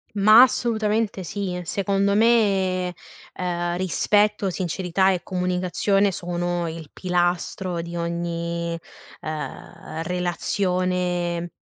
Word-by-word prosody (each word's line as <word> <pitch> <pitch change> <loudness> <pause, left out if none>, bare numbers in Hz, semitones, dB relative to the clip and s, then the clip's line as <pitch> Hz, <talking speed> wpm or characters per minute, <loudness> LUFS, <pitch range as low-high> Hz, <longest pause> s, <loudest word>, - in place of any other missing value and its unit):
Ma 215 +4 +8
assolutamente 220 -5 +1
sì. 180 0 -4
Secondo 200 +2 +1
me, 195 -5 +2 0.4
ehm, 175 -1 -2
rispetto, 205 +3 +2
sincerità 185 +1 0
e 180 - -2
comunicazione 185 +2 +1
sono 175 0 -2
il 160 -2 -7
pilastro 180 0 -1
di 170 +1 -7
ogni, 170 0 -2 0.4
ehm, 155 +1 -6
relazione 180 -1 -1
180 Hz, 90 wpm, -23 LUFS, 175-195 Hz, 0.4 s, Ma